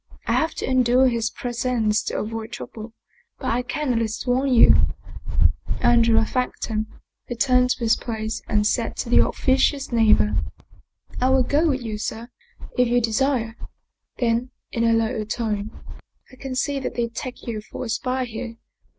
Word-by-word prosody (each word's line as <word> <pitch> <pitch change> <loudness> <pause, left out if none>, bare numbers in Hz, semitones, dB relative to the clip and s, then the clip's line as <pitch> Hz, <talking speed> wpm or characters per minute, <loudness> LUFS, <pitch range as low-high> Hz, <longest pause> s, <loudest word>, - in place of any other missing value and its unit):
I - - -1
have 320 - +1
to - - -3
endure 255 0 +4
his 230 -2 -1
presence 240 -4 -1
to - - -2
avoid 225 +1 -4
trouble, 225 0 -8 0.4
but - - -2
I 240 +2 +1
can 260 +1 -2
at 230 - +1
least 220 -1 -3
warn 260 +2 +1
you" 240 - +7 1.1
Andrea 230 -2 +4
thanked 250 +2 -2
him, 215 -1 -2 0.4
returned 250 +1 +3
to 255 - 0
his 225 -1 +4
place 220 -1 -4
and 210 -1 +1
said 230 +1 0
to 235 - -4
his - - +6
officious 265 +1 +1
neighbor, 215 - +4 0.4
" - - -15
I 255 - +3
will 265 -1 +4
go 300 +6 +2
with 265 -4 0
you, 215 -2 -4
sir, 225 +2 -5 0.5
if 250 0 +3
you 245 +1 +3
desire." 230 0 0 0.6
Then 240 +1 0 0.2
in 230 -1 0
a 230 - +4
lower 225 0 0
tone, 215 -1 -2 0.4
" - - -31
I - - -14
can 260 0 -6
see 275 +2 0
that 265 - -4
they 235 -1 0
take 245 +2 -7
you 225 -3 -4
for 215 - -7
a - - -6
spy 255 +3 -1
here. 230 0 -6
235 Hz, 175 wpm, -23 LUFS, 225-255 Hz, 1.1 s, you